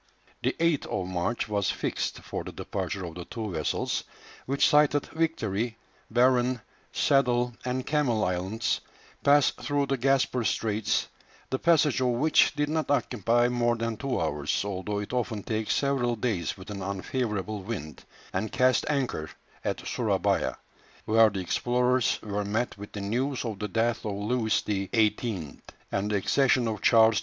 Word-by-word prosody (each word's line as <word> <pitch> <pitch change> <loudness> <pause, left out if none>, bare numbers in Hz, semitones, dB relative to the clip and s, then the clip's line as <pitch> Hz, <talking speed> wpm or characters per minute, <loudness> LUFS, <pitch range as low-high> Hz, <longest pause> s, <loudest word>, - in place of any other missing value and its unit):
The - - 0
8th 165 -3 +2
of 90 - -2
March 90 +6 -1
was 100 -2 0
fixed - - -2
for - - -5
the - - -7
departure 95 -1 -4
of 85 - -7
the 90 0 -7
two 110 -4 -5
vessels, 80 -4 -1 0.4
which 140 +3 +3
sighted 150 -2 +4
Victory, 115 -9 -1 0.3
Barren, 125 +1 +3 0.3
Saddle, 125 -3 +2
and 125 0 -2
Camel 135 -8 +1
Islands, 95 +5 -1 0.4
passed 145 -1 +4
through 145 -1 0
the 135 -1 -1
Gasper 130 -1 +2
Straits 110 -1 0 0.4
the 130 - 0
passage 155 -6 +3
of 130 - +3
which 135 +6 +3
did 145 0 +1
not 155 +1 -1
occupy 120 -3 +2
more 120 -1 +1
than 115 0 -2
two 135 +3 -2
hours, 75 +3 -1
although 100 +1 -3
it 105 +3 -4
often 115 -4 -1
takes 110 -1 -1
several 135 -4 +1
days 110 -7 -2
with 95 +2 -9
an 100 -1 -5
unfavourable 100 +1 -2
wind 95 - -6 0.3
and 110 - -2
cast 130 0 +3
anchor 130 - -1 0.3
at - - -3
Surabaya, - - 0 0.5
where 110 0 +6
the 100 -2 -4
explorers 125 +6 +1
were 105 -1 -2
met 110 +4 -1
with 100 0 -10
the 105 - -5
news 125 +7 -1
of 110 -4 -4
the 105 - -2
death 115 +3 0
of 105 - -2
Louis 110 +2 0
XVIII. 105 - 0 0.3
and 100 +1 -1
the 105 - 0
accession 125 +4 +3
of 110 -1 -3
Charles 110 -1 +6
X. - - +3
115 Hz, 160 wpm, -28 LUFS, 100-130 Hz, 0.5 s, where